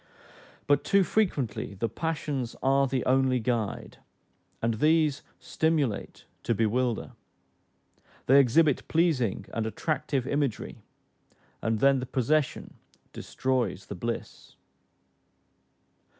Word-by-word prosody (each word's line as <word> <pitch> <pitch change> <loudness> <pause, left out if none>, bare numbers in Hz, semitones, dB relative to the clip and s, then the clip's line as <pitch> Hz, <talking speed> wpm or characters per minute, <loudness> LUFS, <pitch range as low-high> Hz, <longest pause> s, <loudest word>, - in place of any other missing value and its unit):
But 145 - +2
too 200 0 +3
frequently 145 - -1
the 115 +4 -1
passions 150 -5 -3
are 135 +1 +3
the 130 -1 -2
only 130 -1 +3
guide, 115 -3 -3 0.6
and 115 0 0
these 150 +3 +2 0.2
stimulate 155 -9 -1 0.2
to 115 - 0
bewilder: 115 +2 0 1.1
they 135 +2 +6
exhibit 140 +3 +3
pleasing 145 - +1
and 110 -1 -1
attractive 140 +1 -2
imagery, 140 -3 -2 0.8
and 110 +1 0
then 140 -1 +4
the 125 - -5
possession 135 +3 -1 0.3
destroys 125 -7 -2
the 100 - -7
bliss. 115 +6 -6
130 Hz, 100 wpm, -27 LUFS, 115-150 Hz, 1.1 s, they